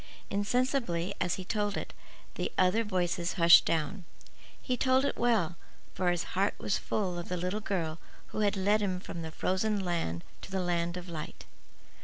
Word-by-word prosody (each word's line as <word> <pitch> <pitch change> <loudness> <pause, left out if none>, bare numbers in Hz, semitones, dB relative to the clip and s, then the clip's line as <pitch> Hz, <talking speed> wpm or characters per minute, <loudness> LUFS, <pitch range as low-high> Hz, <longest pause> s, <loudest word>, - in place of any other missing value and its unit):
Insensibly, 205 -4 0
as 180 -1 +1
he 185 - -7
told 205 0 -1
it, - - -5 0.4
the - - -2
other 185 +5 +4
voices 180 -3 0
hushed 170 -2 +8
down. 160 +4 -1 0.6
He 255 - -1
told 260 +2 +3
it - - 0
well; 215 -8 +1 0.4
for 180 -1 +1
his 175 -1 0
heart 195 +2 +1
was 200 - 0
full 185 -4 -1
of 170 - -7
the 180 - -1
little 180 +5 -2
girl 170 -6 -2 0.3
who - - -4
had 205 -1 +2
led 205 +3 +3
him 185 -3 0
from 170 -2 -7
the 160 - -5
frozen 190 +4 0
land 165 - -1
back - - -26
to - - -9
the 190 - 0
land 175 0 0
of 180 0 -7
light. 160 -3 -7
185 Hz, 185 wpm, -31 LUFS, 175-210 Hz, 0.6 s, hushed